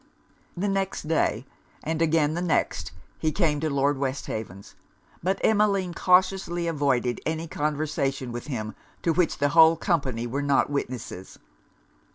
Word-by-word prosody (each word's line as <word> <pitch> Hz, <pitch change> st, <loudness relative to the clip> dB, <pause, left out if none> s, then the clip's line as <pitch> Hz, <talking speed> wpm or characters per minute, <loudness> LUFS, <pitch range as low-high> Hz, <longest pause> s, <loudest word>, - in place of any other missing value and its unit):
The 195 Hz, +4 st, 0 dB
next 195 Hz, -1 st, -1 dB
day, 135 Hz, -7 st, +1 dB, 0.4 s
and 160 Hz, +1 st, -2 dB
again 155 Hz, -2 st, +2 dB
the 175 Hz, -, -2 dB
next, 175 Hz, -, 0 dB, 0.3 s
he 155 Hz, -, +1 dB
came 155 Hz, -4 st, +1 dB
to 155 Hz, +1 st, -1 dB
Lord 140 Hz, 0 st, +1 dB
Westhaven's; 110 Hz, -8 st, -4 dB, 0.5 s
but 190 Hz, +3 st, 0 dB
Emmeline 200 Hz, -4 st, +2 dB
cautiously 180 Hz, -1 st, +2 dB
avoided 140 Hz, -6 st, 0 dB
any 160 Hz, +1 st, -2 dB
conversation 145 Hz, -4 st, -2 dB
with 120 Hz, +3 st, -6 dB
him 110 Hz, -6 st, -4 dB, 0.3 s
to 165 Hz, -, +2 dB
which 175 Hz, 0 st, +1 dB
the 145 Hz, 0 st, +2 dB
whole 160 Hz, +1 st, +7 dB
company 135 Hz, -10 st, -1 dB
were 130 Hz, +4 st, -2 dB
not 140 Hz, 0 st, +2 dB
witnesses. 125 Hz, -9 st, -5 dB
150 Hz, 140 wpm, -26 LUFS, 135-170 Hz, 0.5 s, whole